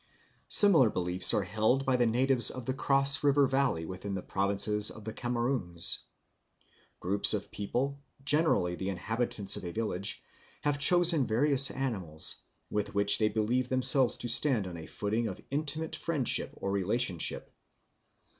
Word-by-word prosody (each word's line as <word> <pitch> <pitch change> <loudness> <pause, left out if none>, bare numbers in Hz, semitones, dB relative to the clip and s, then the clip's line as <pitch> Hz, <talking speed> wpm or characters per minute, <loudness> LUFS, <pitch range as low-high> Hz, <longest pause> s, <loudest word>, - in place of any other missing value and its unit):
Similar 170 - +6
beliefs 90 -1 +3
are 105 - -2
held 110 +8 -2
by 130 - -1
the 120 -1 0
natives 125 +1 +3
of 130 -2 -8
the 130 - -4
Cross 140 +2 +3
River 140 0 +1
valley 135 -11 -2
within 95 +3 -8
the 95 - -8
provinces 100 +2 +2
of 110 - -11
the 110 - -8
Cameroons. 120 -8 -1 1.0
Groups 100 +3 0
of - - -9
people, 130 +7 -5 0.3
generally 145 - 0
the 95 +2 -7
inhabitants 105 +1 -1
of - - -7
a 85 - -7
village, 100 -2 -4 0.4
have 145 -1 -3
chosen 170 -1 +4
various 135 +4 +5
animals, 95 -13 -2 0.3
with 105 -1 -5
which 100 0 +6
they 110 -1 0
believe 120 +4 -3
themselves 130 0 +2
to 120 - -5
stand 120 -2 +1
on 90 -2 -10
a 80 - -12
footing 110 +3 -5
of 95 - -9
intimate 155 +2 -3
friendship 150 -7 -1
or 100 - -7
relationship. 100 -2 -3
115 Hz, 150 wpm, -27 LUFS, 100-135 Hz, 1.0 s, Similar